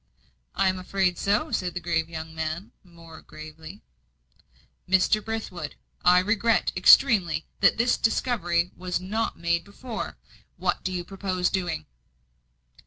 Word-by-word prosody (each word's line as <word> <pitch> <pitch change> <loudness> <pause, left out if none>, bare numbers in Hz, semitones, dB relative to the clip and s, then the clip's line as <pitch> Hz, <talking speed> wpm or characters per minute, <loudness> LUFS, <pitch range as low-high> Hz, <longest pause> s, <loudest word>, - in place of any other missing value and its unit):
"I - - +2
am 185 0 0
afraid 185 -1 0
so," 210 +11 +1
said 180 -1 -2
the - - -1
grave 165 -1 -1
young 160 -1 -7
man, 160 +4 -4
more 170 -3 -14
gravely. 155 +4 -11 1.1
"Mr. 190 +3 +3
Brithwood, 195 -9 -5 0.3
I 180 0 +6
regret 215 +4 +2
extremely 180 - +5
that - - +4
this 235 +2 +2
discovery 180 -8 0
was 180 -1 -3
not 210 +5 -2
made 170 0 0
before. 220 +3 -7 0.4
What - - -1
do 185 - -2
you 180 -1 -3
purpose 185 -1 -2
doing?" 175 - -2
180 Hz, 130 wpm, -26 LUFS, 170-205 Hz, 1.1 s, I